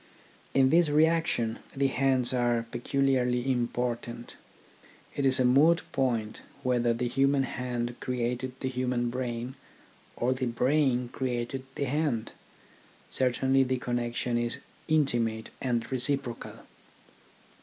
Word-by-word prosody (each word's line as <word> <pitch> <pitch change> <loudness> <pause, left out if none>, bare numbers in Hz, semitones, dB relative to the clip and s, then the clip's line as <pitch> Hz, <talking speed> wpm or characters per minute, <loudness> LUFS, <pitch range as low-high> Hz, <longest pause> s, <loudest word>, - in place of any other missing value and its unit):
In 135 -1 +5
this 170 -1 +5
reaction 155 -7 +2 0.2
the 135 0 +1
hands 130 -1 +2
are 120 -2 +1
pecu 135 +3 -1
liarly 125 -2 +2
important. 120 -2 -2 0.8
It 140 - +2
is 130 0 +3
a 130 - +4
moot 150 +7 +5
point 115 -5 -1 0.2
whether 120 -2 +2
the 120 +1 -1
human 135 +2 +2
hand 120 -1 -3
created 125 +1 -3
the 130 - -1
human 125 -2 -1
brain, 125 0 -3 0.6
or 125 +2 +1
the 130 0 -2
brain 125 0 +1
created 125 +1 -3
the - - -1
hand. 135 -5 -1 0.8
Certainly 130 +1 +2
the 130 0 0
connection 120 0 -1
is 120 0 -2 0.3
intimate 120 -8 +1
and 120 -2 -1
reciprocal. 130 -1 -2
125 Hz, 120 wpm, -29 LUFS, 120-135 Hz, 0.8 s, In